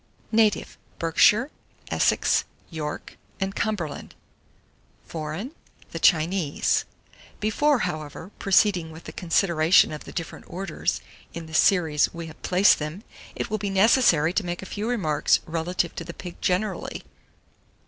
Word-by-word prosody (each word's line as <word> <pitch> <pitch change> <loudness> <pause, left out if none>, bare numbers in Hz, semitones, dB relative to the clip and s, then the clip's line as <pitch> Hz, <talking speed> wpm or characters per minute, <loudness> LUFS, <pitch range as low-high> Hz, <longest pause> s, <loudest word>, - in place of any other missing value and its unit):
Native 220 -2 +2 0.2
Berkshire, 210 - +3 0.4
Essex, - - +2 0.3
York, 150 -2 -6 0.2
and 195 0 -2
Cumberland; 195 -9 -3 0.9
Foreign 160 - -5 0.4
the - - -5
Chinese. 165 -2 +2 0.5
Before, 285 +7 +2
however, 155 +1 -6
proceeding 195 -4 +3
with 160 +1 -11
the - - -8
consideration 170 0 +3
of 150 - -7
the - - -9
different 165 -3 -6
orders, 195 +2 -3 0.3
in 170 -1 -6
the 160 - -12
series 160 -4 +3
we 170 0 -6
have 160 -1 -12
placed 185 +3 +4
them, 155 +7 -5 0.3
it - - -4
will 215 - -1
be 200 0 -2
necessary 195 - +4
to 205 - 0
make 175 +1 -4
a 190 - -9
few 210 +3 -3
remarks 165 -12 +2
relative 170 +1 -2
to - - -3
the 170 0 -9
pig 180 -2 -9
generally. 190 +4 -1
175 Hz, 135 wpm, -25 LUFS, 160-200 Hz, 0.9 s, placed